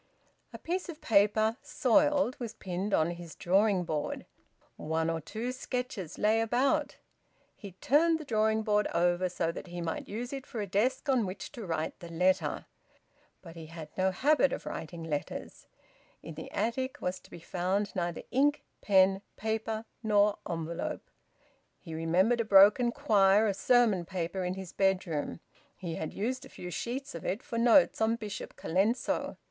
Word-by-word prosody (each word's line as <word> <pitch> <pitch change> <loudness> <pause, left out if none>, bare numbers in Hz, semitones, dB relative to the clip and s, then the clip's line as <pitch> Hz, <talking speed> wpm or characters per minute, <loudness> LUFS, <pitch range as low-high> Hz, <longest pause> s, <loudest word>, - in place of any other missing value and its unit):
A - - -8
piece 360 +2 -3
of 315 -2 -7
paper, 215 -1 +3
soiled, 290 -1 +2
was 235 -3 -5
pinned 185 +2 -4
on 160 -2 +2
his 170 -1 -9
drawing 195 +1 +2
board; 155 -3 -3 0.5
one 160 +1 -1
or 165 -1 -3
two 225 +10 -4
sketches 250 - -4
lay 220 +2 +3
about. 275 +6 +1 0.6
He 200 -4 -10
turned 320 - +3
the 310 - -8
drawing 220 -2 +1
board 210 -1 +2
over, 175 +1 +2
so 165 -1 -1
that 170 - -8
he 175 0 -7
might 170 -1 -4
use 240 +5 -5
it 270 -1 -6
for 230 - -6
a 205 - -1
desk 255 +8 0
on 255 -7 +2
which 185 +1 -7
to 225 -6 -8
write 160 -1 -3
the 170 -2 -9
letter. 180 +3 +1 0.8
But 165 -2 -11
he 165 -1 -9
had 160 -1 -9
no 190 0 +2
habit 280 +7 +3
of - - -5
writing 165 +1 -6
letters. 150 -3 -5 0.6
In 165 - -7
the 160 +1 -8
attic 235 +5 -2
was 180 +1 -3
to - - -20
be 175 - -10
found 185 +5 -2
neither 175 -2 -2
ink, 285 +2 +2 0.2
pen, 190 -1 +4 0.2
paper, 220 0 -2 0.2
nor 210 -2 +3
envelope. 165 -1 -4 0.7
He 165 - -10
remembered 180 +9 +2
a - - 0
broken 210 +4 +6
quire 210 -6 +4
of 200 - 0
sermon 220 -5 +3
paper 185 +1 -3
in 180 +1 -2
his 190 -2 -8
bedroom; 180 -5 0 0.4
he 175 -3 -5
had 160 -1 -4
used 250 +6 -3
a - - -12
few 180 - -8
sheets 255 +8 -4
of 170 - -7
it 205 +7 -2
for 230 - -3
notes 240 +1 +5
on 220 +1 +3
Bishop 210 -4 -7
Colenso. 200 +9 0
200 Hz, 170 wpm, -30 LUFS, 175-235 Hz, 0.8 s, broken